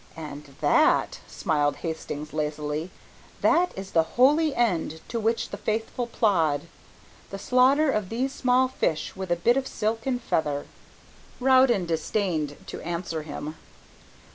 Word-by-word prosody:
"And 145 -3 -9
that," 310 - +3
smiled 150 -5 0
Hastings 155 -2 -5
lazily, 150 +1 -2 0.5
"that 355 +2 +3
is 195 0 -7
the 165 - +4 0.2
holy 295 +4 +4
end 170 -9 0
to 230 - -2
which 225 +1 0
the - - -6
faithful 225 +2 -2
plod, 165 -11 +2 0.7
the 195 - -6
slaughter 260 +7 +4
of 210 -6 -1
these 260 +4 -1
small 255 -1 +3
fish 165 -11 -2
with 190 -2 -5
a - - +4
bit 235 +9 +2
of 265 -1 -1
silk 225 +3 -2
and 250 -2 0
feather." 150 -10 -1 0.7
Rowden 255 -6 +4
disdained 160 -2 -1
to - - -7
answer 170 -1 -3
him. 150 +1 -7
190 Hz, 140 wpm, -26 LUFS, 155-250 Hz, 0.7 s, the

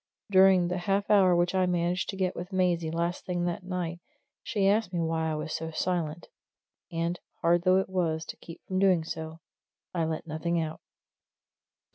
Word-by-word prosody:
During 190 -2 +6
the 180 +1 -2
half 195 +3 0
hour 190 -4 +6
which 175 +1 +2
I 185 -1 +2
managed 175 0 0
to 195 - -3
get 185 -1 -1
with 180 +3 -6
Maisie 175 -3 +1
last 170 +2 -2
thing 175 -1 -2
that 175 0 -2
night, 180 -2 -3 0.4
she 200 -4 0
asked 210 -1 +2
me 175 - -2
why 160 -1 0
I 155 - -1
was 155 +1 -4
so 160 0 -3
silent, 165 -1 -2 0.6
and, 170 +1 -2 0.2
hard 170 +1 +4
though 185 0 +5
it 190 - +1
was 165 -4 -1
to - - -8
keep 165 - -11
from 185 0 -1
doing 185 -4 +4
so, 160 0 -6 0.5
I 170 -2 0
let 160 0 -3
nothing 165 +2 -1
out. 160 -1 -4
175 Hz, 185 wpm, -28 LUFS, 165-185 Hz, 0.6 s, During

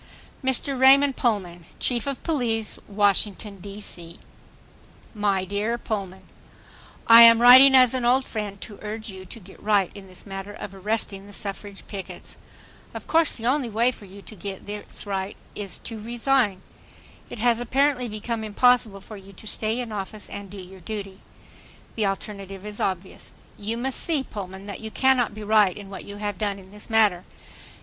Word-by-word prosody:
Mr. 265 +1 0
Raymond 270 +1 +6
Pullman, 180 -8 -1
Chief 240 0 0
of 275 -2 -4
Police, 235 -9 -1
Washington, 205 0 0
D. 200 +2 -9
C. 170 -4 -3 1.0
My 200 -3 0
dear 205 +5 -1
Pullman,— 195 -5 -5 0.8
I 230 0 +10
am 230 0 +9
writing 260 +3 +9
as 255 -2 +6
an 255 -1 -1
old 255 +2 +3
friend 205 -3 -5
to 205 - -8
urge 215 +1 -6
you 190 -1 -10
to 230 - -7
get 195 -1 -16
right 205 -3 +2
in 200 -1 -11
this 185 0 -10
matter 195 0 -7
of 200 - -8
arresting 200 0 -2
the 205 - -12
suffrage 200 0 -6
pickets. 195 -2 -8 0.6
Of - - -7
course 325 -1 +3
the 230 - -6
only 260 0 +1
way 230 +3 +2
for 215 - -13
you 195 +1 -13
to 215 - -11
get 195 0 -7 0.4
right 195 0 -4 0.2
is 200 -2 -4
to 225 -2 -7
resign. 235 -4 +1 0.7
It - - -8
has 235 +1 +2
apparently 255 +1 +1
become 220 +1 -4
impossible 220 -1 +2
for 215 +2 -10
you 195 0 -14
to 195 - -12
stay 220 +2 -1
in 235 -2 -6
office 210 +1 -5
and 200 -1 -7
do 200 - -10
your 185 0 -11
duty. 200 -3 -6 0.7
The 215 -3 0
alternative 195 0 -6
is 210 0 -7
obvious. 190 0 -4 0.2
You 215 +3 -3
must 260 +2 +1
see, 310 -5 +1
Pullman, 190 -4 -8
that 200 -1 -7
you 220 - -5
cannot 255 -2 +2
be 215 - -7
right 210 -3 +3
in 200 -1 -10
what 195 - -8
you 200 - -8
have 205 -2 -4
done 205 -2 -1
in 190 -1 -15
this 210 +2 -9
matter. 210 -5 +3
210 Hz, 175 wpm, -24 LUFS, 195-235 Hz, 1.0 s, I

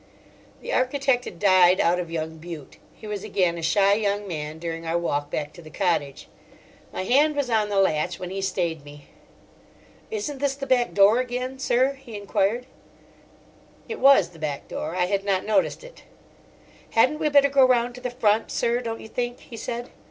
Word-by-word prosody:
The - - -4
architect 255 -1 +1
had - - -8
died 185 -1 +5
out 175 +1 +2
of 175 -2 -4
young 160 -1 -4
Bute; 165 -4 -9 0.2
he - - -13
was 210 -2 -5
again 185 -5 0
a - - -6
shy 195 +4 +3
young 205 -1 -1
man 155 -3 -5
during 165 0 -5
our 165 +1 -1
walk 145 -4 -2
back 150 0 -4
to 170 - -12
the 155 - -12
cottage. 155 -6 -1 0.6
My - - -4
hand 290 +8 +3
was 280 -4 -1
on 215 -2 +2
the 200 - -1
latch 175 -2 +1
when 180 0 -7
he 195 0 -3
stayed 170 -5 -2
me. 145 0 -14 1.0
"Isn't 410 - -4
this 280 -1 0
the 275 0 -6
back 255 -2 +1
door 205 +4 +6
again, 255 +1 -3
sir?" 260 +1 +2
he 230 -5 -8
enquired. 205 +4 0 1.2
It 455 - -5
was 270 -11 +6
the 170 -2 -16
back 150 -3 -4
door; 160 +3 -5
I 180 -1 +2
had 195 +1 -1
not 195 -2 0
noticed 220 - +1
it. - - -13 0.9
"Hadn't 260 +7 +3
we 305 - +1
better 280 -1 +5
go 275 -1 +5
round 245 -1 +3
to 250 - -11
the 250 - -3
front, 225 -3 +1
sir, 235 +1 0
don't 225 -2 -5
you - - -10
think?" 245 +2 -3
he 235 - -11
said. 235 +2 -5
205 Hz, 195 wpm, -24 LUFS, 170-250 Hz, 1.2 s, door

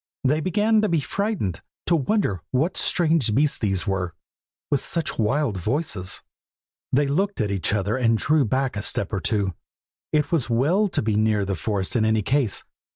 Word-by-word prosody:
They 145 +4 +2
began 210 +6 +2
to 215 - +1
be 170 -2 +2
frightened, 180 - -2 0.2
to 170 - +3
wonder 145 - 0
what 145 +8 0
strange 160 -10 +2
beasts 145 +2 +2
these 95 -4 0
were, 90 -4 -2 0.6
with 145 - +3
such 165 -3 -2
wild 115 0 +1
voices. 105 - -3 0.7
They 145 +3 +3
looked 190 +8 0
at 105 -3 0
each 95 -4 0
other 105 +3 0
and 115 -3 +2
drew 150 +5 +2
back 130 +2 0
a 105 - -2
step 105 -1 -1
or 100 - 0
two, 95 +2 0 0.6
it 150 -2 +1
was 155 -9 0
well 155 - +2
to 185 - -1
be 110 -1 0
near 105 -1 +2
the 95 - -2
forest 95 +3 -2
in 115 - +3
any 110 -1 +2
case. 130 -4 0
125 Hz, 180 wpm, -24 LUFS, 105-155 Hz, 0.7 s, to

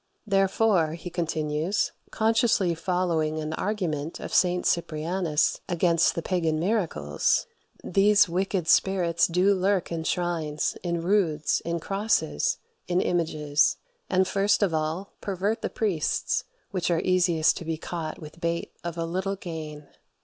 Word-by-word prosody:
"Therefore," 195 -4 +2
he 170 +2 -7
continues, 160 +1 -1 0.2
consciously 220 -5 +2
following 165 -2 0
an 155 0 -3
argument 165 -6 -2
of - - -7
St. 180 -1 +3
Cyprianus 165 0 0
against 170 -1 +2
the 170 - -3
pagan 165 -4 0
miracles, 165 - 0 0.4
"these 205 +2 +4
wicked 180 0 -1
spirits 175 -2 +3
do 180 +4 +3
lurk 190 -1 0
in 165 -1 -2
shrines, 165 -4 -1
in 170 -2 -2
roods, 170 -5 +1
in 170 0 -1
crosses, 195 - 0 0.3
in 180 0 +1
images: 155 -5 +1 0.3
and 185 0 +3
first 200 +2 +2
of 185 -5 +1
all 160 +5 -2
pervert 200 +3 -1
the - - -2
priests, 190 -9 -1 0.3
which 185 -4 -1
are 170 -2 +2
easiest 175 -3 +3
to - - -6
be 160 0 -2
caught 160 -1 -5
with 155 +2 -12
bait 170 0 -2
of 170 0 -5
a 165 - -1
little 190 +4 -2
gain. 155 -5 -7
175 Hz, 135 wpm, -26 LUFS, 160-190 Hz, 0.4 s, these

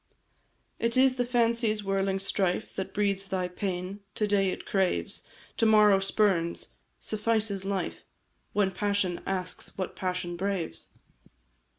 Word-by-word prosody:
"It 230 +1 +1
is 260 0 +5
the 245 - +1
fancy's 230 -3 +1
whirling 195 0 0
strife 195 -2 -1
That 190 - -3
breeds 200 -1 0
thy 185 -1 -1
pain 185 +1 -4 0.2
to 210 - +1
day 200 -2 +3
it - - -5
craves, 190 -2 0 0.4
To 225 - +4
morrow 210 -2 +6
spurns 195 -4 +1 0.3
suffices 215 -2 -1
life 195 -1 -2 0.5
When 200 -2 +2
passion 200 -2 0
asks 185 -2 -3
what 185 -2 -3
passion 180 -2 -2
braves? 185 - -3
195 Hz, 125 wpm, -28 LUFS, 185-210 Hz, 0.5 s, morrow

